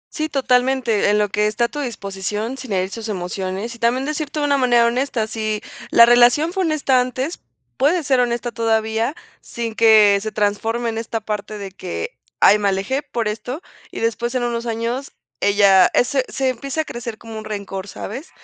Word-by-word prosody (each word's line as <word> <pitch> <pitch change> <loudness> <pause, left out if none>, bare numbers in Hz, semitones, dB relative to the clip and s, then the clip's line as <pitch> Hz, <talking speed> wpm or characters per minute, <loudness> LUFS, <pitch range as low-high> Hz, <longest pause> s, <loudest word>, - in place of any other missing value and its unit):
Sí, 310 -1 -2
totalmente, 250 -5 +2
en 210 - +3
lo 210 0 +2
que 210 +1 +1
está 215 +3 -1
a - - 0
tu 295 - -6
disposición 210 -2 -4
sin 255 -4 -9
herir 185 0 0
sus 225 0 -6
emociones, 190 +4 -4
y 235 - -13
también 240 +3 +1
decirte 305 0 -3
de 290 - +1
una 285 -1 +2
manera 240 -2 +4
honesta, 245 -1 0
si 215 -1 -3 0.3
la 235 - +8
relación 245 +7 +5
fue 380 -1 0
honesta 280 -5 +2
antes, 255 +6 -3 0.4
puede 315 +5 +2
ser 270 -3 +2
honesta 240 0 0
todavía, 225 +3 0 0.3
sin 230 -2 -5
que 215 -3 +6
se 215 0 -4
transforme 225 +3 -1
en 225 0 -3
esta 225 0 -3
parte 210 0 -5
de 195 -2 -7
que: 195 - -5 0.3
"Ay, 210 +1 +7
me 205 - +1
alejé 195 +9 -1
por 230 -6 -3
esto", 245 +8 -4 0.3
y - - -7
después, 235 +2 -1
en 250 - 0
unos 235 0 -2
años, 230 +4 -3 0.3
ella 200 -2 +5 0.2
se 265 0 0
se 265 0 -1
empieza 275 +5 -2
a - - -6
crecer 235 -2 -6
como 225 -1 -9
un 215 - -6
rencor, 200 -2 -5
¿sabes?, 255 - -7
235 Hz, 190 wpm, -20 LUFS, 210-260 Hz, 0.4 s, la